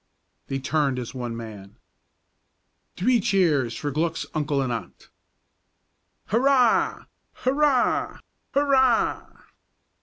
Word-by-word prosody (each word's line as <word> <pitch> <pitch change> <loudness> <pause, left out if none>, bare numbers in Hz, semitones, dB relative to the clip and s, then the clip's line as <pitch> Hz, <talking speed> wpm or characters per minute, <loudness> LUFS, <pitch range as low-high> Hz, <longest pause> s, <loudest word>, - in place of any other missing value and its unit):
They 135 - -2
turned 140 -1 0
as 125 0 -5
one 120 -3 -5
man. 105 -4 -10 1.2
"Three 240 +6 +3
cheers 150 - +1
for 145 - -3
Glück's 160 +3 -1
uncle 145 -2 -1
and 130 -3 -1
aunt!" 105 -6 -8 1.2
"_Hurrah! 250 +1 +2 0.3
Hurrah! 275 0 +1 0.4
Hurrah! 265 -4 +2
155 Hz, 90 wpm, -24 LUFS, -, 1.2 s, Three